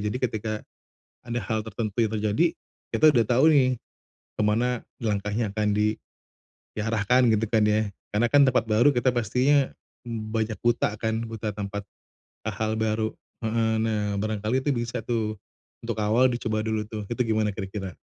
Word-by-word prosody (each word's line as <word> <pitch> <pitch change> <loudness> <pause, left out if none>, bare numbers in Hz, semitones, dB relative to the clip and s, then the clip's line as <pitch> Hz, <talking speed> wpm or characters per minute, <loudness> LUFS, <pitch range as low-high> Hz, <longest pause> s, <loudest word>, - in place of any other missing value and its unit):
jadi 115 - -3
ketika, 110 -4 -2 0.7
ada 120 0 -2
hal 110 +1 -2
tertentu 110 -1 -4
yang 110 - -3
terjadi, 110 +9 +2 0.5
kita 155 - +4
udah 120 -6 +3
tahu 125 +5 +3
nih, 135 -4 +5 0.7
kemana 115 +3 +1 0.2
langkahnya 105 +1 -1
akan 105 -1 0
di, 105 +1 +1 0.8
diarahkan 115 +3 +3
gitu 110 0 +1
kan 110 -2 +3
ya 105 0 +2 0.2
karena 115 +3 +2
kan 145 +2 +6
tempat 130 -3 +3
baru 120 +7 +5
kita 125 +1 +1
pastinya 130 +5 +2 0.3
banyak 110 -1 -2
buta 120 -3 +2
kan, 110 0 -1
buta 110 -1 -4
tempat, 100 0 -4 0.7
hal 110 +1 -1
baru, 110 0 0 0.3
heeh, 110 0 +1
nah 105 -2 0
barangkali 110 +5 -1
itu 145 - +1
bisa 120 -2 -2
tuh, 110 -2 -1 0.5
untuk - - -3
awal 110 +5 +4
dicoba 110 -2 -1
dulu 110 -1 -1
tuh 110 -1 -5
itu 125 - -1
gimana 105 -1 +1
kira-kira? 95 -4 -5
110 Hz, 150 wpm, -26 LUFS, 105-120 Hz, 0.8 s, kan